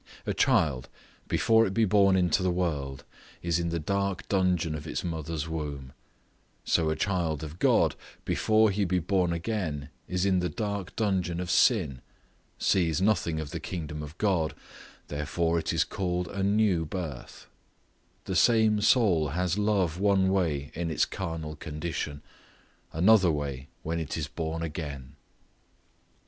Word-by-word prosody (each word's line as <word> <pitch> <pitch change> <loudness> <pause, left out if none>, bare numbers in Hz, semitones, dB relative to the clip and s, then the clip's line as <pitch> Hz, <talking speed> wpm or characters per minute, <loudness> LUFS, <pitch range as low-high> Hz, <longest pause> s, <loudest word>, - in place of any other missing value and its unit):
A - - -1
child, 70 -6 +2 0.4
before 115 0 +3
it 95 - -5
be 115 -1 +4
born 100 -1 +4
into 90 0 +2
the 95 - +1
world, 75 -7 -2 0.4
is 85 0 +1
in 85 0 -1
the 85 - -1
dark 100 +3 -2
dungeon 90 -5 +1
of 75 +1 -6
its - - -3
mother's 80 -2 -3
womb; 75 -5 -5 0.7
so 80 -2 +2
a 80 - 0
child 80 -4 -1
of 80 +2 -8
God, - - +3 0.3
before 110 -1 +3
he 100 +1 0
be 90 -1 +1
born 90 0 +1
again, 85 -6 -3 0.2
is 90 +1 -1
in 95 -2 +3
the 90 0 -1
dark 100 +1 -4
dungeon 95 -5 0
of 90 0 -3
sin, 80 - +3 0.6
sees 85 -5 +2
nothing 90 -5 +1
of 75 -2 -5
the - - -4
kingdom 75 -4 -5
of 75 +3 -9
God, 90 -7 +1 0.5
therefore 80 +3 -1
it - - -2
is - - +2
called 90 -2 -2
a 100 - -4
new 100 -3 +2
birth; 80 -5 -6 0.8
the 95 - -3
same 110 0 +4
soul 100 - +4
has 90 +2 0
love 95 -5 +1
one 95 -2 +3
way 80 -7 0
in 85 0 -3
its 80 - +2
carnal 80 -4 -5
condition, 75 -1 -5 0.7
another 95 +2 +5
way 70 -3 -4 0.2
when 85 +1 -2
it 80 -1 -4
is 75 -2 -2
born 80 0 -4
again. 75 -4 -6
85 Hz, 155 wpm, -28 LUFS, 80-95 Hz, 0.8 s, another